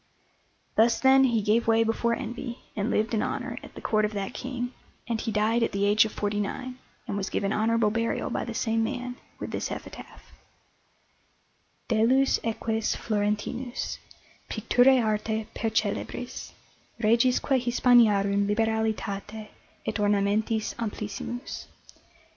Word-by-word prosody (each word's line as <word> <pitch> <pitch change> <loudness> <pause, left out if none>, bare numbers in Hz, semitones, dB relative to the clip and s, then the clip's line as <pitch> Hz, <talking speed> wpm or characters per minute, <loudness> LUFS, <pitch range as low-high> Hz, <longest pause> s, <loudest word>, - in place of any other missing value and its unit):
Thus, 230 +1 +4
then, 265 0 +6
he 230 -4 +1
gave 225 +3 +2
way 225 0 +5
before 235 +1 +1
envy, 240 -1 -5 0.2
and 205 +2 -1
lived 220 +1 0
in 215 - +2
honour - - -3
at - - -13
the - - -8
Court 215 -1 +1
of 210 0 0
that 200 -1 -3
King; 250 -1 -4 0.3
and 230 -2 -1
he 225 - -2
died 215 +3 +2
at 230 - 0
the 200 0 +1
age 210 +2 +5
of 215 - -4
forty 205 0 -2
nine, 255 +5 -4 0.3
and - - -3
was 200 -1 -2
given 200 +1 -1
honourable 225 0 +2
burial 230 +1 -1
by - - -1
the - - -6
same 225 -1 +1
man, 250 0 -4 0.2
with - - -6
this - - -2
epitaph: - - -9 1.6
DELLUS 250 +4 +3
EQUES 225 0 -1
FLORENTINUS 215 +4 -2 0.5
PICTURÆ 245 +3 +4
ARTE 215 0 -1
PERCELEBRIS 225 -1 -2 0.5
REGISQUE 245 +4 +3
HISPANIARUM 215 -5 +4
LIBERALITATE 220 -1 -1 0.4
ET - - -2
ORNAMENTIS 210 +2 +1
AMPLISSIMUS. 215 +2 -5
225 Hz, 135 wpm, -27 LUFS, 210-240 Hz, 1.6 s, then